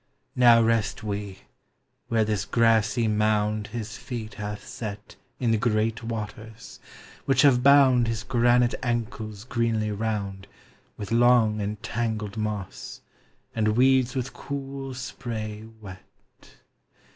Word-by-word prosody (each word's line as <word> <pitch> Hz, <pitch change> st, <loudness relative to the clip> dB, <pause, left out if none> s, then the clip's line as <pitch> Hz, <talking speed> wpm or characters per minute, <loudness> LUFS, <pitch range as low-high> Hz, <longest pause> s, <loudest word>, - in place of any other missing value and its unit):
Now 120 Hz, -2 st, +6 dB
rest 115 Hz, -2 st, 0 dB
we, 100 Hz, -2 st, -5 dB, 0.7 s
where 110 Hz, -2 st, +2 dB
this 105 Hz, -2 st, -1 dB
grassy 115 Hz, 0 st, +2 dB
mound 105 Hz, 0 st, +1 dB
His 110 Hz, -2 st, -6 dB
feet 120 Hz, -4 st, -6 dB
hath 105 Hz, 0 st, -6 dB
set 105 Hz, -2 st, -7 dB, 0.2 s
In 120 Hz, -3 st, +1 dB
the 110 Hz, -, +2 dB
great 110 Hz, -1 st, 0 dB
waters, 110 Hz, 0 st, -7 dB, 0.5 s
which 135 Hz, -1 st, +3 dB
have 130 Hz, -4 st, +5 dB
bound 130 Hz, -3 st, +5 dB
His 115 Hz, -1 st, -2 dB
granite 120 Hz, -1 st, +3 dB
ankles 110 Hz, -4 st, -3 dB
greenly 115 Hz, -3 st, -1 dB
round 100 Hz, -2 st, -3 dB, 0.5 s
With 105 Hz, +1 st, -7 dB
long 115 Hz, -2 st, +4 dB
and 105 Hz, +1 st, -3 dB
tangled 110 Hz, -3 st, -3 dB
moss, 105 Hz, -3 st, -5 dB, 0.5 s
and 110 Hz, -1 st, 0 dB
weeds 130 Hz, -1 st, +3 dB
with 130 Hz, 0 st, -3 dB
cool 135 Hz, -1 st, -6 dB
spray 110 Hz, -4 st, -6 dB
wet. 95 Hz, -3 st, -15 dB
110 Hz, 120 wpm, -25 LUFS, 105-120 Hz, 0.7 s, Now